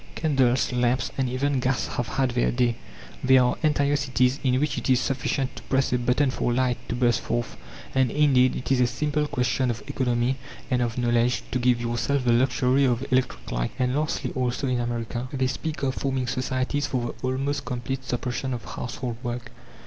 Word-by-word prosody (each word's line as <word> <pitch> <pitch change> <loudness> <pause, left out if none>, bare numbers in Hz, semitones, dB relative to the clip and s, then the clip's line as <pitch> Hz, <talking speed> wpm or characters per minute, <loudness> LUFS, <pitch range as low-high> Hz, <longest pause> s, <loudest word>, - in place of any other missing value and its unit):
Candles, 135 -5 +2
lamps, 125 0 +1
and 130 -2 0
even 135 +2 0
gas 130 0 0
have 120 - -2
had 130 +1 0
their 120 0 +1
day. 120 -1 +1 0.5
There 130 0 +6
are 125 - +2
entire 145 -2 +2
cities 130 -1 +1
in 130 -1 +2
which 150 +1 0
it - - -4
is 130 -1 +5
sufficient 135 0 -1
to - - -7
press 135 -1 +2
a 125 - +2
button 125 +3 +2
for 125 - -1
light 125 0 +1
to - - -1
burst 120 -1 +2
forth, 120 0 -2 0.4
and, 130 -2 +3
indeed, 130 -2 +4
it 125 - -4
is 130 -2 +4
a 125 - +4
simple 150 +4 -1
question 125 0 0
of 120 -1 -3
economy 130 -2 0 0.3
and 125 -1 +2
of 120 -1 -1
knowledge 120 0 +2
to 125 - 0
give 120 -1 +3
yourself 120 +3 -1
the 120 - +4
luxury 130 +2 +3
of 125 -1 +1
electric 125 - 0
light. - - -1
And 125 0 +1
lastly, 155 +2 -1
also 130 0 -1
in 125 -2 0
America, 120 +1 -3
they 130 -2 0
speak 150 +4 -3
of 130 -1 +1
forming 130 -2 -1
societies 130 +3 -1
for 120 -2 -2
the 130 - -1
almost 140 +2 -1
complete 125 +2 -3
suppression 125 +1 -2
of 120 - -8
household 125 -1 -5
work. 120 0 -5
125 Hz, 195 wpm, -25 LUFS, 120-135 Hz, 0.5 s, There